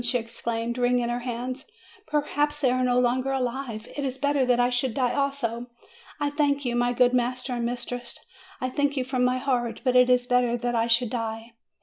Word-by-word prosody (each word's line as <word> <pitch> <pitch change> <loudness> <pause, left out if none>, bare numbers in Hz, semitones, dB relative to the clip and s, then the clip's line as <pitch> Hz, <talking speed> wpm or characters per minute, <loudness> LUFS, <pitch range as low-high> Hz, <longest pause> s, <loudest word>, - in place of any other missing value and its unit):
she 245 +1 +2
exclaimed, 230 +1 -3
wringing 245 -1 +2
her 240 0 -1
hands; 250 +2 -5 0.4
"perhaps 295 0 0
they 265 -4 +3
are 255 0 +1
no 250 0 +3
longer 255 +2 +1
alive! 250 -4 -3
It 285 - -3
is 265 -1 -2
better 285 -2 +1
that 245 -1 +3
I 245 +1 +3
should 245 -1 0
die 250 -3 +1
also. 270 -4 -1 0.5
I 290 0 0
thank 285 -1 +1
you, 240 -1 0
my 245 0 +2
good 245 0 +3
master 250 +1 0
and 235 -1 -1
mistress; 245 0 -4 0.4
I 255 0 -2
thank 285 +1 0
you 260 - +1
from 255 -1 -1
my 250 0 +2
heart. 250 -3 -1
But 255 -1 +1
it 250 0 +6
is 250 -1 +4
better 245 -1 +2
that 240 0 -2
I 230 0 +1
should 235 0 +2
die. 225 -1 -4
250 Hz, 210 wpm, -26 LUFS, 240-265 Hz, 0.5 s, it